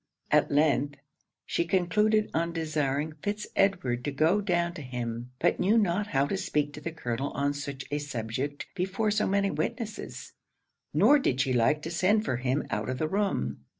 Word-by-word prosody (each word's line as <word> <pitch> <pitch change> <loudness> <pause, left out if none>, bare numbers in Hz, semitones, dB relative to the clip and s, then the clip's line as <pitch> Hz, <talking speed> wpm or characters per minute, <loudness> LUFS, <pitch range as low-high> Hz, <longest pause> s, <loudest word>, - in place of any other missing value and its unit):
At - - +4
length, 145 -1 +2 0.5
she - - 0
concluded 210 +5 +2
on 170 +1 0
desiring 155 -2 -1
Fitz 210 +3 -2
Edward 155 -12 +1
to 145 - -1
go 160 +8 +3
down 175 -3 0
to 160 - -8
him; 120 -2 -4
but - - +1
knew 210 +5 +3
not 205 -1 +2
how 135 -6 +2
to 195 - -2
speak 145 -5 -1
to 150 - -8
the 170 - -4
colonel 135 -3 -3
on 140 0 0
such 140 -1 -6
a 145 - 0
subject 135 +1 -4
before 195 +4 0
so 210 +1 +1
many 200 0 +2
witnesses, 220 -3 -4 0.6
nor 295 - +5
did 130 - 0
she 135 -1 +2
like 150 +6 +2
to 165 - -4
send 205 +6 +2
for 125 - 0
him 130 +3 0
out 105 +1 -2
of 130 - -2
the 155 - 0
room. 170 - -1
155 Hz, 185 wpm, -28 LUFS, 135-195 Hz, 0.6 s, nor